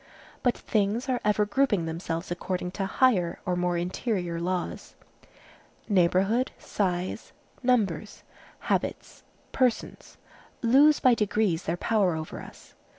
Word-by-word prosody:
But 245 - +1
things 215 +4 0
are 250 -1 0
ever 210 0 +2
grouping 205 -5 +1
themselves 165 +1 -4
according 180 0 -3
to 195 0 -3
higher 195 -7 +2
or 180 - 0
more 175 0 0
interior 175 -1 -2
laws. 180 0 -3 0.9
Neighborhood, 195 +5 +2
size, 185 0 -3 0.3
numbers, 215 - 0 0.4
habits, - - -2 0.3
persons, 250 -3 -1 0.5
lose 280 +6 +6
by 255 -2 +5
degrees 210 -5 0
their 170 +2 -1
power 200 -6 +1
over 155 0 -6
us. - - -14
195 Hz, 115 wpm, -27 LUFS, 175-230 Hz, 0.9 s, lose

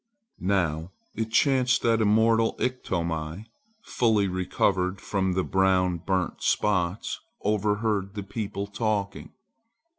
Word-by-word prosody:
Now 85 -3 0 0.2
it 110 0 -3
chanced 130 -1 +3
that 115 -1 +3
immortal 110 +1 +3
Iktomi, 85 -7 -2 0.4
fully 110 - +2
recovered 95 +1 0
from 95 -2 -1
the 95 +1 0
brown 95 -2 +2
burnt 90 0 -2
spots, 95 -2 0 0.2
overheard 105 -1 0
the 100 - -4
people 100 0 -4
talking. 100 -1 -2
100 Hz, 100 wpm, -26 LUFS, 95-110 Hz, 0.4 s, chanced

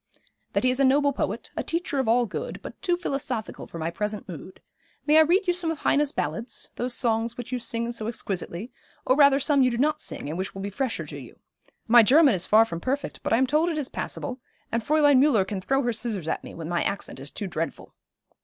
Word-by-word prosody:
'That - - +1
he 255 - +4
is 255 - -3
a - - +4
noble 280 +2 +3
poet, - - -3
a - - -1
teacher 335 -4 -2
of 265 - 0
all 240 +2 +4
good; - - -5
but - - -10
too 350 -1 +1
philosophical 275 -9 -4
for - - -9
my 165 +1 -2
present 210 +4 -4
mood. 180 +1 -9 0.5
May 305 +1 +6
I - - +9
read 355 +6 +3
you 355 - +2
some 345 -2 0
of 325 - -2
Heine's 290 -1 +2
ballads, 160 - -4
those 245 0 -2
songs 230 -1 0
which 245 0 -7
you 250 - -1
sing 235 0 -2
so 220 -2 -4
exquisitely, 205 -1 -4 0.3
or 255 - +4
rather 280 -1 +6
some 285 0 +3
you 255 - +4
do 235 - -3
not 300 +4 +1
sing, - - -4
and 160 +4 -4
which 190 +1 -4
will 195 - -6
be 200 - -4
fresher 260 +3 -2
to - - -8
you. - - -13 0.5
My 235 +1 +8
German 275 +4 +6
is 185 -1 0
far 220 +1 +6
from 170 -7 -5
perfect, 275 +8 -3
but - - -3
I 225 - +5
am 260 - +3
told 305 +6 +2
it 325 - -2
is 285 -4 -2
passable, 260 -1 -4 0.3
and 230 0 -1
Fräulein 290 0 +4
Müller 245 -9 +4
can 200 -3 -4
throw 270 +8 +1
her 240 -1 0
scissors 210 -8 -2
at - - -2
me - - -10
when 165 -1 -6
my 175 0 0
accent 200 - -3
is 135 +2 -5
too 200 - -5
dreadful.' 165 -5 -5
245 Hz, 245 wpm, -25 LUFS, 205-285 Hz, 0.5 s, I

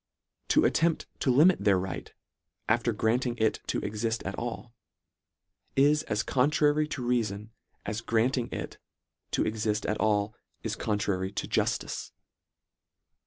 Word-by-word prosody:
To - - +4
attempt 165 0 +2
to 135 - 0
limit 150 - +5
their 100 -2 +4
right, 95 0 -4 0.6
after 120 +2 +2
grant 115 +4 +1
ing 120 -1 -3
it 110 -1 +1
to - - 0
exift 115 +1 -2
at 95 - -2
all, 120 +1 -5 1.0
is 145 +2 +4
as 105 +1 -1
contrary 150 +3 +2
to 135 -4 -4
reafon, 110 -4 -1 0.4
as 105 +2 -3
granting 120 +2 +1
it - - -6 0.5
to - - +1
exift 110 -1 -1
at 105 - -1
all 105 -1 +1 0.3
is - - -2
contrary 100 -3 -1
to - - -3
juftice. - - -1
115 Hz, 135 wpm, -29 LUFS, 105-130 Hz, 1.0 s, limit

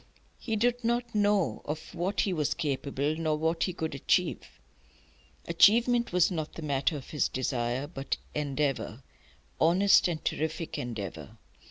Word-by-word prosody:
He 225 -3 -2
did 245 +2 +1
not 235 0 0
know 205 -3 +2
of 155 +3 -6
what 180 +3 0
he 195 - 0
was 150 -4 0
capable, 140 0 -1
nor 155 -1 0
what 160 +2 0
he 185 - -3
could 160 -3 -3
achieve. 140 - 0 0.9
Achievement 235 +7 +4
was 180 +1 +3
not 155 -3 -3
the 165 - -8
matter 145 +2 0
of 135 - -10
his 150 - +1
desire; 130 0 -1
but 140 -3 -4 0.2
endeavour, 140 -4 -2 0.6
honest 185 +6 +5
and 165 -3 -4
terrific 160 +1 -2
endeavour. 100 - -6
160 Hz, 145 wpm, -29 LUFS, 140-190 Hz, 0.9 s, honest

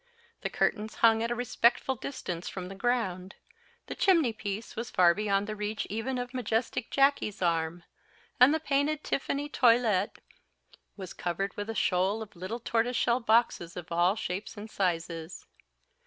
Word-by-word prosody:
The - - -2
curtains 215 0 -1
hung 225 -1 +4
at 230 - -1
a 240 - -1
respectful 245 +1 +2
distance 185 -9 -5
from 185 -1 -6
the - - -7
ground; 195 -4 -1 0.5
the - - -5
chimney 330 - +3
piece 210 0 -5
was 235 +1 -4
far 175 -1 +5
beyond 200 0 0
the 215 0 -5
reach 210 +1 -3
even 230 +5 -2
of 245 0 -4
the 255 - -5
majestic 230 0 -1
Jacky's 275 -7 +2
arm; 170 -1 0 0.6
and 250 +3 +8
the 315 - +1
painted 295 0 0
tiffany 280 +1 -2
toilet 230 -7 +3 0.8
was 190 -3 -7
covered 180 +3 -3
with 205 +1 -5
a 225 - -3
shoal 195 +4 +1
of 205 - -15
little 185 +7 -5
tortoise 235 +1 0
shell 240 +1 +2
boxes 225 -7 +1
of 175 -1 -8
all 175 +3 +3
shapes 200 0 -5
and 215 +1 -8
sizes. 170 -2 -2
215 Hz, 165 wpm, -29 LUFS, 185-245 Hz, 0.8 s, and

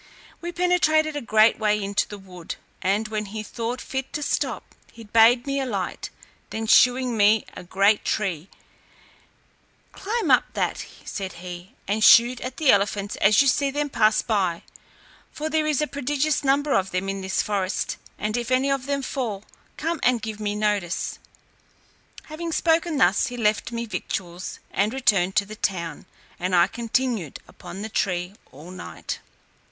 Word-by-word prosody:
We 345 +1 -4
penetrated 335 -3 +2
a 290 - -2
great 220 0 +4
way 210 -1 +2
into 200 0 0
the 205 - -8
wood, 180 -3 -9 0.3
and 205 +4 +1
when 215 -1 -2
he 215 +2 -6
thought 235 +3 -4
fit 265 -1 -5
to 300 - -2
stop, - - -1 0.3
he 230 - -12
bade 230 +3 +5
me 275 0 -1
alight; 200 -9 -3 0.4
then 225 0 -4
shewing 250 +2 +4
me 210 0 +4
a - - -7
great 195 +4 +2
tree, 190 -5 -2 1.4
"Climb 445 +4 -2
up - - +5
that," - - -2 0.2
said 190 -2 -5
he, 175 +1 -9
"and 215 +2 0
shoot 240 +3 +7
at 255 0 -6
the 300 -4 +5
elephants 200 0 +1
as 205 +6 +5
you - - +1
see 280 +1 +2
them 290 +1 -2
pass 215 -3 +3
by, 190 -7 0 0.7
for 310 +1 -4
there 310 0 +1
is 300 -1 +1
a - - +2
prodigious 290 +2 -1
number 280 +1 +2
of 190 0 +1
them 185 +2 -2
in 195 0 -3
this 190 0 0
forest, 195 -2 -2 0.2
and 215 +1 -2
if 240 -1 -3
any 260 +2 +2
of 270 -1 -1
them 280 -1 -1
fall, 225 -8 -3 0.3
come 325 +1 -2
and 245 -3 +2
give 220 -1 -5
me 210 -1 -2
notice." 205 -4 -1 1.0
Having 330 +1 -5
spoken 325 -1 +2
thus, 190 -3 +3
he 245 -1 -6
left 215 0 +1
me 235 0 -3
victuals, 185 -5 -5
and 210 +6 0
returned 200 -9 +2
to 200 - +3
the 215 +2 -9
town, 175 -5 -3 0.3
and 180 +1 0
I 170 0 +6
continued 235 - -2
upon 195 +3 -9
the - - -3
tree 180 -3 -1 0.2
all 155 +6 -12
night. 185 - -7
220 Hz, 170 wpm, -24 LUFS, 195-270 Hz, 1.4 s, shoot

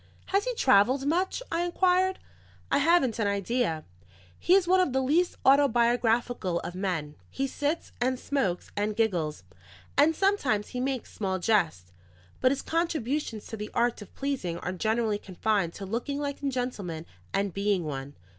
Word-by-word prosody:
"Has 400 +3 +3
he - - -2
travelled 255 - +4
much?" 360 +10 0
I 335 - +1
inquired. 370 +1 +2 0.5
"I 280 - +4
haven't 285 -7 +3
an 215 - +2
idea. 200 -4 0 0.6
He 360 - +4
is 385 -3 +3
one 370 +1 +5
of 360 -8 +2
the 265 - +2
least 310 +7 +2
autobiographical 240 -7 +3
of 175 - -6
men. 180 -6 -2 0.2
He 270 - -2
sits, 290 +4 -2
and 255 +1 +1
smokes, 230 -12 -1
and 210 +1 -1
giggles, 175 - 0 0.5
and 305 +3 +4
sometimes 285 - +1
he 250 - -4
makes 260 -1 -3
small 190 -3 -1
jests; 175 - +1 0.5
but 255 - +4
his 280 - -2
contributions 300 -8 -1
to 225 - -7
the 210 0 -5
art 240 -1 +1
of 205 - -12
pleasing 265 -12 -2
are 180 - -4
generally 220 +2 0
confined 195 -2 -1
to 195 - -6
looking 240 +8 -3
like 285 0 -4
a 280 - 0
gentleman 205 -11 -4 0.3
and 195 -2 0
being 200 -3 0
one. 140 -1 -5
240 Hz, 165 wpm, -28 LUFS, 200-285 Hz, 0.6 s, one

